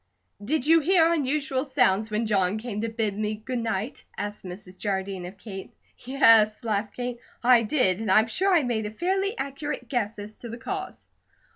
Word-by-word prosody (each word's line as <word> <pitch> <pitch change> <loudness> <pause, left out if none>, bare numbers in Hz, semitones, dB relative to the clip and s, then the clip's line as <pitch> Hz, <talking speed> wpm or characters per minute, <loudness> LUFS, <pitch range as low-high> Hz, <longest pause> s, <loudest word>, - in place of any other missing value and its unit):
"Did 275 +4 0
you 325 +2 +6
hear 335 +1 +4
unusual 280 -3 0
sounds 225 -7 +2
when 215 +2 -1
John 200 -2 +1
came 215 -2 -4
to 230 - -1
bid 220 -3 -2
me 215 +1 -2
good 245 +4 -4
night?" 225 +1 -3
asked 205 0 -5
Mrs. 185 0 -9
Jardine 190 -2 -3
of 190 +2 -11
Kate. 195 -3 -8 0.3
"Yes," 230 -5 +4
laughed 210 -2 -2
Kate, 245 -1 -4 0.2
"I 245 -1 +6
did. 215 -5 +2
And 220 -2 -3
I'm 215 +3 +6
sure 370 - +1
I 340 -5 +4
made 225 -4 -1
a - - -4
fairly 385 - -1
accurate 280 +2 -4
guess 225 -5 -1
as 210 +1 -9
to 235 - -8
the 230 - -6
cause." 380 +10 -6
225 Hz, 185 wpm, -26 LUFS, 210-275 Hz, 0.3 s, you